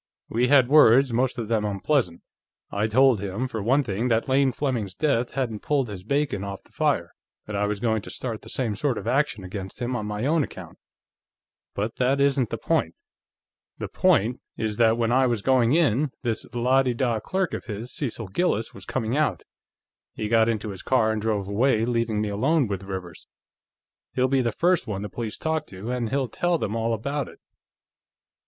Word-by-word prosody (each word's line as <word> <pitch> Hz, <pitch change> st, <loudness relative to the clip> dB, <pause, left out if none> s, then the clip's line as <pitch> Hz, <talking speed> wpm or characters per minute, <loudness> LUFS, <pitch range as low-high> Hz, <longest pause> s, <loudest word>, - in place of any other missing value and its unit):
We 120 Hz, +2 st, +1 dB
had 135 Hz, -2 st, +5 dB
words, 135 Hz, -3 st, +6 dB
most 125 Hz, +2 st, +1 dB
of 115 Hz, -3 st, -3 dB
them 110 Hz, -1 st, +1 dB
unpleasant. 100 Hz, -, 0 dB, 0.5 s
I 105 Hz, +2 st, 0 dB
told 125 Hz, -1 st, +4 dB
him, 100 Hz, +6 st, -2 dB
for 115 Hz, -4 st, -4 dB
one 130 Hz, +7 st, +3 dB
thing, 110 Hz, +2 st, -2 dB
that 115 Hz, -2 st, +1 dB
Lane 135 Hz, 0 st, +3 dB
Fleming's 120 Hz, -9 st, -2 dB
death 135 Hz, -6 st, 0 dB
hadn't 120 Hz, -6 st, -2 dB
pulled 135 Hz, -3 st, 0 dB
his 95 Hz, -3 st, -7 dB
bacon 140 Hz, -4 st, -1 dB
off 100 Hz, -1 st, -6 dB
the -, -, -25 dB
fire, -, -, 0 dB, 0.3 s
that 105 Hz, -, -6 dB
I 105 Hz, +1 st, +1 dB
was 105 Hz, -1 st, -2 dB
going 110 Hz, -1 st, 0 dB
to -, -, -10 dB
start 115 Hz, -4 st, -4 dB
the -, -, -12 dB
same 115 Hz, -5 st, -1 dB
sort 130 Hz, +3 st, 0 dB
of -, -, -6 dB
action 125 Hz, -4 st, 0 dB
against 95 Hz, +1 st, -7 dB
him 125 Hz, +1 st, -2 dB
on 105 Hz, -3 st, -3 dB
my 105 Hz, +3 st, -3 dB
own 155 Hz, +1 st, +3 dB
account. -, -, -9 dB, 1.0 s
But 105 Hz, +3 st, -3 dB
that 130 Hz, +2 st, +2 dB
isn't 140 Hz, -4 st, +2 dB
the -, -, -3 dB
point. -, -, 0 dB, 0.8 s
The -, -, -5 dB
point 115 Hz, +5 st, +2 dB, 0.2 s
is 110 Hz, -2 st, -2 dB
that 115 Hz, -1 st, +4 dB
when 115 Hz, -1 st, +1 dB
I 130 Hz, +1 st, +4 dB
was 115 Hz, -4 st, -1 dB
going 130 Hz, -2 st, +3 dB
in, 150 Hz, -3 st, +3 dB
this 115 Hz, -3 st, -2 dB
la 125 Hz, +3 st, +3 dB
de 125 Hz, -2 st, -1 dB
da 120 Hz, -2 st, 0 dB
clerk 190 Hz, -, -2 dB
of -, -, -4 dB
his, 115 Hz, +3 st, -6 dB
Cecil 115 Hz, -7 st, -4 dB
Gillis, 115 Hz, -, 0 dB
was -, -, -9 dB
coming 120 Hz, -1 st, -2 dB
out. 145 Hz, -, 0 dB, 0.7 s
He 105 Hz, -, -3 dB
got 115 Hz, 0 st, +4 dB
into 110 Hz, -1 st, -2 dB
his 95 Hz, -, -8 dB
car 115 Hz, -4 st, +2 dB
and 110 Hz, -1 st, -2 dB
drove 105 Hz, -3 st, -1 dB
away, 110 Hz, +2 st, +2 dB
leaving 115 Hz, -3 st, 0 dB
me 105 Hz, -, -1 dB
alone 135 Hz, +9 st, +2 dB
with 100 Hz, -3 st, -4 dB
Rivers. 95 Hz, -4 st, -7 dB, 0.9 s
He'll 130 Hz, 0 st, +3 dB
be 135 Hz, 0 st, +2 dB
the 120 Hz, -2 st, 0 dB
first 175 Hz, -, +1 dB
one 100 Hz, -2 st, -3 dB
the 105 Hz, -, -5 dB
police 110 Hz, +1 st, -5 dB
talk 160 Hz, 0 st, -2 dB
to, 100 Hz, +5 st, -6 dB
and 120 Hz, -3 st, -1 dB
he'll 135 Hz, +1 st, 0 dB
tell 175 Hz, +9 st, 0 dB
them 110 Hz, -7 st, -3 dB
all 115 Hz, 0 st, 0 dB
about 140 Hz, +6 st, -3 dB
it." -, -, -16 dB
115 Hz, 200 wpm, -25 LUFS, 105-130 Hz, 1.0 s, words